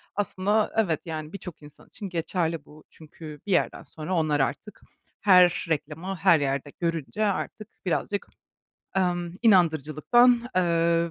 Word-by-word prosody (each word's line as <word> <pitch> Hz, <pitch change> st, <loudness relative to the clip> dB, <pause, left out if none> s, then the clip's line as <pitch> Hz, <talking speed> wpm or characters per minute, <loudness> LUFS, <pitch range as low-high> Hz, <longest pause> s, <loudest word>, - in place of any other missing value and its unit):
Aslında 205 Hz, +2 st, 0 dB
evet, 175 Hz, -9 st, +1 dB
yani, 155 Hz, 0 st, -6 dB
birçok 180 Hz, -5 st, -9 dB
insan 145 Hz, -1 st, -16 dB
için 200 Hz, -3 st, -8 dB
geçerli 165 Hz, -2 st, -2 dB
bu 150 Hz, +1 st, -16 dB
çünkü 155 Hz, -1 st, -12 dB
bir -, -, -2 dB
yerden 180 Hz, -, +1 dB
sonra 155 Hz, +3 st, -6 dB
onlar 155 Hz, -3 st, +1 dB
artık 150 Hz, +9 st, -3 dB, 0.4 s
her 180 Hz, -3 st, +5 dB
reklamı, 160 Hz, +5 st, -3 dB
her 170 Hz, -2 st, +4 dB
yerde 140 Hz, 0 st, -2 dB
görünce 165 Hz, +4 st, -1 dB
artık 205 Hz, +1 st, -3 dB, 0.2 s
birazcık, 200 Hz, +3 st, -2 dB, 0.7 s
emm, 175 Hz, -2 st, 0 dB
inandırıcılıktan, 195 Hz, -, +4 dB
emm 170 Hz, -1 st, +2 dB
170 Hz, 130 wpm, -26 LUFS, 155-195 Hz, 0.7 s, her